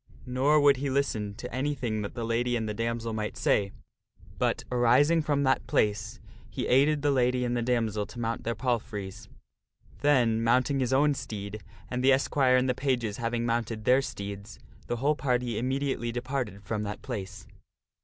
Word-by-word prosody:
Nor 135 Hz, +4 st, +3 dB
would 140 Hz, -2 st, +5 dB
he 140 Hz, +1 st, -2 dB
listen 110 Hz, -7 st, -1 dB
to -, -, -8 dB
anything 130 Hz, -5 st, -2 dB
that 100 Hz, -, -6 dB
the 120 Hz, -, -3 dB
lady 120 Hz, +2 st, 0 dB
and 110 Hz, -2 st, -1 dB
the 105 Hz, -, -2 dB
damsel 115 Hz, +1 st, -2 dB
might 105 Hz, -1 st, -3 dB
say, 100 Hz, -1 st, +1 dB, 0.7 s
but, -, -, 0 dB
arising 130 Hz, +7 st, +4 dB
from 145 Hz, -2 st, 0 dB
that 130 Hz, -1 st, +1 dB
place, 105 Hz, +2 st, 0 dB, 0.3 s
he -, -, -4 dB
aided 145 Hz, +3 st, +3 dB
the 145 Hz, -, +3 dB
lady 125 Hz, -1 st, +2 dB
and 120 Hz, 0 st, -1 dB
the 120 Hz, -, 0 dB
damsel 115 Hz, -4 st, 0 dB
to 120 Hz, -, -10 dB
mount 115 Hz, 0 st, -2 dB
their 115 Hz, 0 st, -2 dB
palfreys. 105 Hz, -4 st, -3 dB, 0.7 s
Then 120 Hz, -6 st, +3 dB
mounting 130 Hz, +4 st, +2 dB
his 130 Hz, -1 st, 0 dB
own 145 Hz, +2 st, +4 dB
steed, 105 Hz, -4 st, -6 dB, 0.3 s
and 125 Hz, 0 st, -3 dB
the 135 Hz, +1 st, +6 dB
esquire 130 Hz, -1 st, +3 dB
and 130 Hz, +1 st, +2 dB
the 125 Hz, -, +2 dB
pages 125 Hz, -6 st, -1 dB
having 120 Hz, 0 st, -1 dB
mounted 115 Hz, -2 st, -2 dB
their 130 Hz, +2 st, +5 dB
steeds, 100 Hz, -3 st, -7 dB, 0.3 s
the -, -, -1 dB
whole 140 Hz, +5 st, +1 dB
party 125 Hz, -5 st, -1 dB
immediately 130 Hz, -1 st, -1 dB
departed 120 Hz, -4 st, -4 dB
from 105 Hz, +1 st, -3 dB
that 105 Hz, 0 st, -5 dB
place. 100 Hz, -6 st, -6 dB
120 Hz, 175 wpm, -28 LUFS, 110-130 Hz, 0.7 s, the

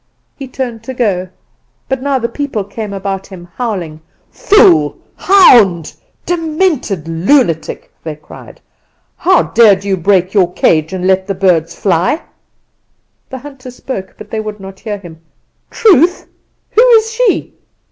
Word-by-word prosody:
He 275 Hz, -, -8 dB
turned 250 Hz, -3 st, -5 dB
to 260 Hz, -, -6 dB
go, 190 Hz, -7 st, -1 dB, 0.6 s
but 265 Hz, -1 st, -2 dB
now 280 Hz, 0 st, 0 dB
the 235 Hz, -2 st, -2 dB
people 270 Hz, -6 st, -4 dB
came 205 Hz, +1 st, -7 dB
about 195 Hz, -1 st, -4 dB
him, 180 Hz, -3 st, -12 dB
howling. 180 Hz, -10 st, -4 dB, 0.3 s
"'Fool, 410 Hz, -4 st, +3 dB, 0.2 s
hound, 220 Hz, -, +4 dB, 0.3 s
demented 320 Hz, -, -1 dB
lunatic!' 165 Hz, -, 0 dB
they 155 Hz, -2 st, -5 dB
cried. 150 Hz, -, -14 dB, 0.6 s
'How 370 Hz, 0 st, +3 dB
dared 205 Hz, -4 st, +4 dB
you 200 Hz, -1 st, 0 dB
break 185 Hz, +1 st, +1 dB
your 185 Hz, -4 st, +2 dB
cage 155 Hz, -1 st, +1 dB
and 185 Hz, -1 st, -4 dB
let 190 Hz, 0 st, +1 dB
the 195 Hz, -, -2 dB
birds 170 Hz, -3 st, +1 dB
fly?' 185 Hz, -, 0 dB, 1.1 s
"The 260 Hz, -, -6 dB
hunter 270 Hz, -1 st, -11 dB
spoke; 245 Hz, -6 st, -7 dB
but -, -, -12 dB
they 220 Hz, -, -3 dB
would 215 Hz, -1 st, -6 dB
not 190 Hz, 0 st, -11 dB
hear 210 Hz, -2 st, -5 dB
him. 170 Hz, -4 st, -13 dB, 0.5 s
"'Truth! 360 Hz, -, +3 dB, 0.5 s
who 455 Hz, -, +4 dB
is 450 Hz, -3 st, +4 dB
she? -, -, 0 dB
210 Hz, 140 wpm, -13 LUFS, 185-275 Hz, 1.1 s, hound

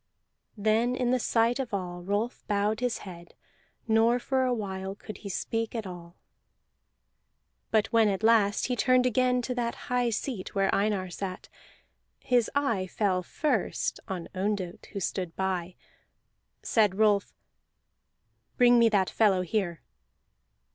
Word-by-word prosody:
Then 220 Hz, +4 st, +2 dB
in 250 Hz, -1 st, 0 dB
the 255 Hz, -, +2 dB
sight 230 Hz, +2 st, +2 dB
of 245 Hz, -6 st, -2 dB
all 175 Hz, -2 st, -5 dB
Rolf 205 Hz, +6 st, -2 dB
bowed 210 Hz, +1 st, 0 dB
his 245 Hz, -1 st, -1 dB
head, 175 Hz, -2 st, -11 dB, 0.5 s
nor 225 Hz, +2 st, +4 dB
for 260 Hz, +1 st, 0 dB
a 255 Hz, -, +1 dB
while 195 Hz, -4 st, -3 dB
could 215 Hz, -, -9 dB
he 200 Hz, -, -7 dB
speak 225 Hz, +4 st, -2 dB
at 225 Hz, -2 st, -3 dB
all. 175 Hz, -1 st, -9 dB, 1.5 s
But 220 Hz, -1 st, +3 dB
when 225 Hz, -1 st, +5 dB
at 200 Hz, +1 st, -1 dB
last 220 Hz, -2 st, +4 dB
he 250 Hz, -, -1 dB
turned 255 Hz, +1 st, +3 dB
again 250 Hz, 0 st, +2 dB
toward 250 Hz, +1 st, -3 dB
that 235 Hz, -1 st, -1 dB
high 245 Hz, -1 st, -1 dB
seat 225 Hz, -3 st, -4 dB
where 195 Hz, -1 st, +2 dB
Einar 195 Hz, -3 st, 0 dB
sat, 185 Hz, 0 st, -6 dB, 0.7 s
his 245 Hz, -3 st, +2 dB
eye 230 Hz, -10 st, +1 dB
fell 185 Hz, -1 st, 0 dB
first 290 Hz, -, -1 dB
on 185 Hz, -5 st, -5 dB
Ondott 190 Hz, -2 st, -3 dB
who 200 Hz, -, -6 dB
stood 180 Hz, -2 st, -3 dB
by. 185 Hz, -2 st, -2 dB, 0.9 s
Said 210 Hz, -4 st, +2 dB
Rolf: 210 Hz, -2 st, +3 dB, 1.3 s
"Bring 245 Hz, -1 st, +6 dB
me 230 Hz, -1 st, +5 dB
that 195 Hz, -3 st, +1 dB
fellow 200 Hz, -4 st, +3 dB
here!" 180 Hz, -2 st, -2 dB
215 Hz, 140 wpm, -28 LUFS, 190-240 Hz, 1.5 s, Bring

